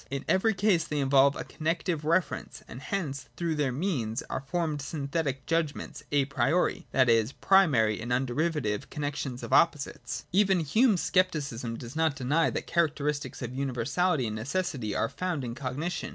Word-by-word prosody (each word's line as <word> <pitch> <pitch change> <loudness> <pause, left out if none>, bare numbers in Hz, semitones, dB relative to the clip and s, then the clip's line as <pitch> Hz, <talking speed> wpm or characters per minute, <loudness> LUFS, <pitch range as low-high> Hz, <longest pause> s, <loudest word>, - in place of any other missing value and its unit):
In 140 0 -4
every 215 +3 +3
case 190 -4 +3
they 150 - -4
involve 140 +1 +4
a - - -4
connective 165 0 -2
reference, 170 +3 -1
and 125 - -9
hence 140 -9 -4
through 170 -2 -1
their 145 -4 0
means 130 - -2
are - - -2
formed 150 +1 -2
synthetic 140 -2 -3
judg 165 -3 0
ments - - -8
a 145 -2 +3
priori, 135 +5 0
that 130 -1 +4
is, 115 +2 +3
primary 125 - +3
and 120 +2 -5
underivative 130 -2 -1
con 150 - -5
nexions 140 -3 -3
of - - -4
opposites. 150 -4 +1
Even 190 -1 +3
Hume's 205 - +3
scepticism 140 -11 0
does 120 +2 -9
not 160 -2 +2
deny 145 +6 +1
that - - -6
the - - 0
characteristics 150 -4 -1
of 120 +1 -5
universality 135 +4 0
and 110 -1 -3
necessity 120 - -2
are - - +1
found 175 0 -3
in 120 -2 -4
cognition. 140 +7 -3
145 Hz, 170 wpm, -28 LUFS, 130-170 Hz, -, involve